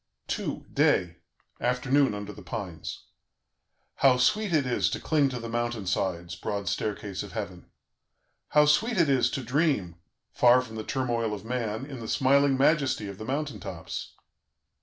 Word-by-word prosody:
"II. - - -4
DAY 85 -2 +2 0.4
(Afternoon, 130 0 +2
under 105 0 -6
the 105 - -12
pines) 90 -3 -6 0.9
"How 135 -2 +5
sweet 205 +11 +2
it 155 -5 +2
is 105 -7 +1
to - - -3
cling 150 -3 +2
to 125 -2 -4
the 115 - -6
mountain 120 -2 -2
sides, 90 -2 -1
broad 100 +2 -4
staircase 100 0 -2
of - - -8
heaven! - - -6 0.8
"How 150 0 +5
sweet 220 +11 +2
it 165 -4 +4
is 135 -3 +3
to 135 - -4
dream, 125 - 0 0.3
far 125 +1 +5
from 110 -3 -10
the 110 - -4
turmoil 120 -5 -1
of 105 - -10
man, 115 0 -2
in 135 -3 -8
the 115 - -7
smiling 140 +1 +3
majesty 140 -6 +2
of 100 0 -8
the 110 - -6
mountain 140 -2 -2
tops! - - -6
120 Hz, 160 wpm, -27 LUFS, 105-140 Hz, 0.9 s, How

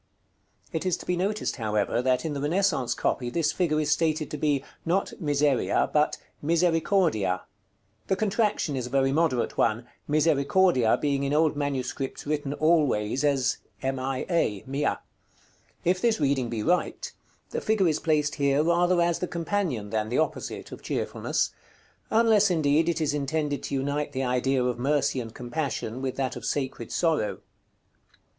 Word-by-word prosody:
It 160 - -1
is 185 -2 0
to - - -11
be 180 - 0
noticed, 200 +4 -1
however, 110 0 0
that 125 +1 +1
in 155 - -2
the 140 - -4
Renaissance 145 -6 +1
copy 120 -2 -1
this 160 +4 +1
figure 160 -4 0
is 150 -1 0
stated 155 0 +1
to 150 - -3
be, 145 -2 +1 0.2
not 180 +4 0
Miseria, 145 - +1
but 150 0 +2 0.2
"Misericordia." 165 - +1 0.6
The 190 - +2
contraction 210 -7 0
is 125 -2 -3
a - - -9
very 135 +1 +2
moderate 145 -5 0
one, 115 +3 +1 0.2
Misericordia 150 -3 +3
being 140 -2 0
in 140 +1 -1
old 155 0 +3
MS. 140 -3 -2 0.3
written 145 -1 -2
always 145 -7 +2
as 140 -4 +2 0.3
"Mia." 135 - -1 0.9
If 180 +2 +2
this 230 -5 +2
reading 135 -4 +1
be 115 -2 -3
right, 180 +7 0 0.4
the - - -2
figure 215 -4 +2
is 155 - +1
placed 150 -2 +1
here 140 +1 +3
rather 175 +2 +3
as 170 -1 +1
the 180 - -2
companion, 165 - -2
than 110 -1 -1
the 125 - 0
opposite, 155 - -2
of - - -9
Cheerfulness; - - -1 0.6
unless, 220 -2 +4
indeed, 160 -1 +2
it 165 -1 -1
is 150 -2 +1
intended 145 0 -1
to - - -3
unite 145 +2 -2
the 135 0 -1
idea 125 +1 +1
of 125 -1 -1
Mercy 140 0 +1
and 115 -2 -6
Compassion 125 -1 -4
with 130 -1 -2
that 130 -1 -2
of 125 - -8
Sacred 130 -2 -3
Sorrow. 160 -11 0
145 Hz, 155 wpm, -26 LUFS, 130-165 Hz, 0.9 s, unless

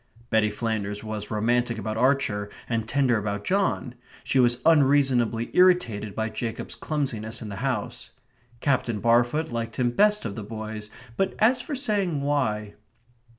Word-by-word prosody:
Betty 110 -1 +3
Flanders 105 -2 -3
was 110 -1 -5
romantic 120 +2 +1
about 110 0 -3
Archer 115 -5 +1 0.2
and 115 -2 -2
tender 125 -3 +2
about 100 0 -3
John; 190 - 0 0.3
she 135 - +1
was 120 -1 +4
unreasonably 135 -7 +3
irritated 120 - +3
by 110 0 -1
Jacob's 110 +1 -4
clumsiness 120 -7 -3
in 105 - -7
the 100 - -6
house. 125 -2 -3 0.5
Captain 125 -5 0
Barfoot 120 +7 +2
liked 115 -1 -3
him 120 -1 +1
best 210 +10 +3
of 100 - -3
the 110 - -6
boys; 110 0 -6 0.3
but 195 - 0
as 245 +3 +3
for 285 +4 -5
saying 200 - 0
why 110 -8 -1
120 Hz, 150 wpm, -25 LUFS, 110-140 Hz, 0.5 s, was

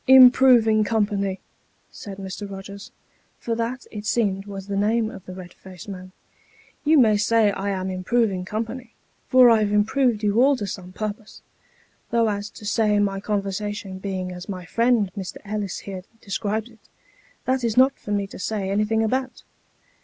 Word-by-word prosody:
" - - -38
Improving 250 -4 +7
company! 205 -3 0 0.3
" - - -41
said 195 -2 -9
Mr. 195 +1 -6
Eogers, 200 +1 -9 0.5
for 230 - -3
that, 235 +2 -3
it 210 -1 -6
seemed, 205 -3 0
was 195 -1 -7
the 200 0 -4
name 220 +2 +1
of 195 - -11
the 185 - -7
red 180 -2 -10
faced 185 -1 -12
man. 185 -2 -8 0.4
" - - -30
You 310 +1 +4
may 220 -6 +5
say 215 0 +3
I 200 +1 -3
am 190 -1 -2
improving 190 0 0
company, 225 +6 -5 0.3
for 255 -2 +7
I've 215 -2 +3
improved 220 +2 +2
you 210 +3 +3
all 280 +2 +5
to 210 - -4
some 185 -2 -7
purpose; 215 +2 -6 0.7
though 230 -1 +2
as 205 0 -3
to 210 0 0
my 195 -1 0
conversation 205 -1 -3
being 190 -2 -4
as 180 +2 -9
my 185 -2 -5
friend 230 0 +2
Mr. 190 -3 -6
Ellis 205 -2 -3
here 190 -2 -7 0.2
describes 215 +3 -3
it, 225 - -20 0.7
that 260 -1 0
is 230 -1 -1
not 260 +2 +6
for - - -11
me 205 -1 0
to 195 - -11
say 195 0 -2
anything 215 +2 +1
about. 255 +3 -2
210 Hz, 175 wpm, -23 LUFS, 195-230 Hz, 0.7 s, Improving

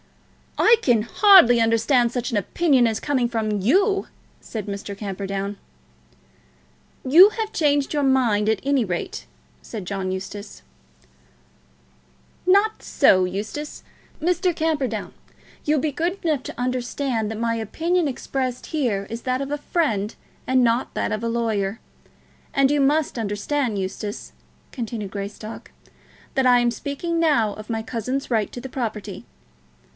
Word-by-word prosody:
"I 460 +1 +6
can 235 - +3
hardly 245 - +6
understand 230 +2 +3
such 245 +1 -3
an 225 - 0
opinion 265 - +2
as 220 -1 -1
coming 260 -5 0
from 215 -3 -1
you," 390 - +2 0.3
said 215 -4 -6
Mr. 200 0 -6
Camperdown. 200 0 -4 1.5
"You 350 +9 +9
have 440 0 -4
changed 290 -2 +1
your 295 - +1
mind, 240 -6 +2
at 220 -3 +1
any 275 -2 +2
rate," 180 -4 -4 0.4
said 215 -5 -7
John 190 0 -3
Eustace. 195 - -7 1.8
"Not 405 +4 +3
so, 185 -1 +4
Eustace. 210 +11 -5 0.4
Mr. 355 +1 +1
Camperdown, 285 - -1 0.5
you'll 300 0 +2
be 300 +2 -1
good 340 +6 -2
enough 305 -5 +1
to - - -8
understand 250 -2 -1
that 220 - -5
my 230 0 0
opinion 325 - 0
expressed 255 -1 -3
here 240 -11 -1
is 230 +1 -5
that 255 0 -1
of 275 0 -4
a 295 - 0
friend, 230 - -1 0.3
and 260 -1 +3
not 235 +1 +1
that - - -1
of 215 +1 -2
a 230 - 0
lawyer. 225 -3 -1 0.8
And 275 0 +4
you 290 -1 +2
must 285 -2 +1
understand, 220 +3 -1
Eustace," 195 +2 -5 0.4
continued 225 -5 -5
Greystock, 205 +2 -7 0.6
"that 265 -1 +2
I 245 -1 +6
am 240 0 +2
speaking 310 +7 -3
now 280 -11 +2
of 215 +1 -11
my 225 -1 -2
cousin's 255 +4 -3
right 220 -3 +1
to - - -7
the 265 - -7
property. 215 -6 -5
240 Hz, 140 wpm, -23 LUFS, 210-290 Hz, 1.8 s, You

